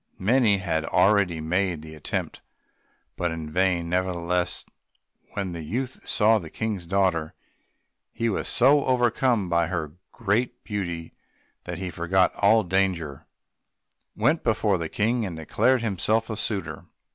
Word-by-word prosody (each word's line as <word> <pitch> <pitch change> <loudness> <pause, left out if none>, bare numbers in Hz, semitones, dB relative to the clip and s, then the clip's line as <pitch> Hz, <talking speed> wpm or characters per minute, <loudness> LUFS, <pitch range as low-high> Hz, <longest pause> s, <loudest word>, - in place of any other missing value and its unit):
Many 110 0 +3
had 85 -4 -1
already 95 -2 +3
made 85 0 -1
the 80 0 -10
attempt, 75 -1 -4 0.7
but 90 - -1
in 80 -2 -6
vain; 90 -1 +1
nevertheless 90 0 -1 0.7
when 100 -3 -2
the 85 -1 -6
youth 125 - -4
saw 110 0 +4
the 80 -5 -9
King's 105 -5 -4
daughter 90 -4 +1 0.8
he 115 - -2
was 110 - -1
so 140 +3 +4
overcome 120 -4 +2
by 85 -1 +2
her 85 -4 -3 0.2
great 115 +3 -1
beauty 85 -6 -4 0.5
that 90 -1 -5
he 90 0 -4
forgot 90 +3 +2
all 110 +2 +4
danger, 90 -6 -1 0.9
went 155 +2 +2
before 105 -4 +1
the 80 -1 -3
King, 115 +3 0
and 90 -6 -4
declared 120 +10 +1
himself 110 +2 0
a - - -2
suitor. 105 -3 -3
95 Hz, 135 wpm, -25 LUFS, 85-110 Hz, 0.9 s, saw